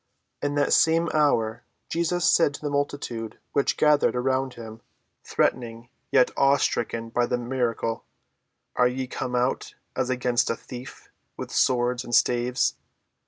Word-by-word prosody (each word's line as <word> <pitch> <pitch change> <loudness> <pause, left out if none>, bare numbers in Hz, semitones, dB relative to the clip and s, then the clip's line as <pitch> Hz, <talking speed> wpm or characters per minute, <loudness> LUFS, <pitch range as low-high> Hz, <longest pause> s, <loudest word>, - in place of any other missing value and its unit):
In 145 0 -1
that 145 -1 +2
same 165 +1 +4
hour 120 -6 +1 0.2
Jesus 170 +1 0
said 145 -4 +4
to - - -10
the 145 -1 -3
multitude 140 -6 -3
which 140 - +1
gathered 150 -3 +3
about 130 +1 0
him, 115 -1 -10 0.4
threatening, 120 -1 -1 0.2
yet 130 -2 +4
awe‐stricken 120 -4 +1
by 120 0 +2
the 125 - 0
miracle, 120 -2 -2 0.7
"Are 125 - +4
ye 130 +1 -3
come 125 0 -4
out, 125 +2 -1 0.2
as 130 -1 -1
against 125 -1 +1
a 115 - 0
thief, 125 +2 -11 0.3
with - - -6
swords 125 0 +1
and 120 - -1
staves? 125 +1 +2
125 Hz, 140 wpm, -25 LUFS, 120-140 Hz, 0.7 s, same